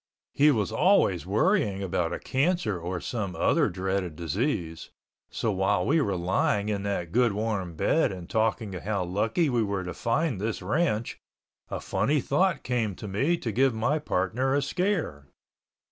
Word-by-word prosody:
He 150 +2 +5
was 110 -8 +1
always 140 - +3
worrying 105 - +1
about 90 -3 -1
a - - -2
cancer 135 - 0
or 85 +2 -4
some 100 -6 -4
other - - +2
dreaded 95 -2 -2
disease, 85 - -2 0.4
so 110 - -1
while 95 -2 +1
we 155 +3 +3
were 100 -7 0
lying 95 +4 0
in 100 -2 -1
that 100 -4 -3
good 120 0 +3
warm 100 -5 -2
bed - - +2
and 90 -3 -8
talking 110 -1 0
how 95 +1 -2
lucky 110 - 0
we 120 -4 +1
were 100 -3 -1
to 90 -1 -5
find 120 - -1
this 110 -3 -3
ranch 115 - 0 0.5
a - - -3
funny 150 +1 0
thought 180 +9 +1
came 115 -6 -1
to 105 - -8
me 135 - +1
to 120 -8 -3
give 130 +2 +2
my 140 +8 +1
partner 130 +2 0
a 145 - +1
scare. 155 - -1
105 Hz, 165 wpm, -27 LUFS, 95-135 Hz, 0.5 s, He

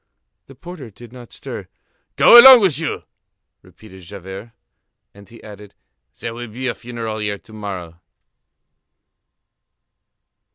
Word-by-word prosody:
The 135 - -16
porter 165 -4 -12
did 115 +3 -16
not 125 -2 -14
stir. - - -10 0.5
"Go 240 - +8
along 260 -1 +9
with 170 -8 0
you!" 160 - -5 0.6
repeated 95 -4 -18
Javert. 95 +4 -11 0.6
And 100 -1 -18
he 115 - -17
added: 105 -1 -14 0.4
"There 115 - -6
will 120 +1 -9
be 120 +4 -8
a 125 - -2
funeral 115 -2 -7
here 105 -1 -4
to 110 - -20
morrow." 95 -6 -9
110 Hz, 125 wpm, -18 LUFS, 100-125 Hz, 0.6 s, along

